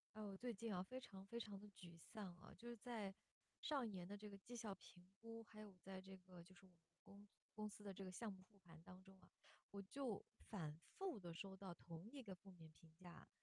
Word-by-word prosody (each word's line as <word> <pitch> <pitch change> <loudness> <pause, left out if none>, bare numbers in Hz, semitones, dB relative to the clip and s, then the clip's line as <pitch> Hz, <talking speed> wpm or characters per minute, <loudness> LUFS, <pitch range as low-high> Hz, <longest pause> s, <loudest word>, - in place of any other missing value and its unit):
啊， 215 - +2
我 200 -2 +2
最 245 +4 +4
近 225 0 +4
啊， 180 - +7
非 255 +8 +1
常 195 -6 -3
非 235 +4 +2
常 210 -4 +2
地 210 +1 -4
沮 175 -3 -5
丧 195 0 0
啊， - - -6
就 240 - -2
是 240 - +2
在 215 -4 +3 0.5
上 280 -5 +7
一 - - +4
年 185 -3 +2
的 200 +2 +1
这 210 +1 -1
个 200 - -2
绩 240 +5 -2
效 215 -4 +3
评 180 -2 -9
估， 230 0 0
还 215 0 -5
有 210 -2 -2
在 190 0 0
这 190 0 -3
个 180 -1 -6
就 175 +3 -10
是 175 - -10
我 190 - -10
们 - - -21 0.2
公 200 +1 -7 0.3
公 215 0 +4
司 210 0 -4
的 200 -1 +2
这 195 0 +1
个 185 - +2
项 210 +3 +3
目 190 -1 -5
付 200 +2 -16
款 165 -4 -8
当 180 +2 -5
中 190 0 -9
啊。 - - -14 0.4
我 200 - +1
就 225 +2 +4 0.3
反 160 -8 +4 0.2
复 385 - +5
地 175 -2 +1
收 190 +3 +1
到 190 -2 0
同 170 +4 -2
一 275 0 0
个 195 -3 +1
负 195 +2 -7
面 165 -3 -5
评 160 0 -12
价， 175 0 -5
195 Hz, 275 characters per minute, -53 LUFS, 185-215 Hz, 0.5 s, 啊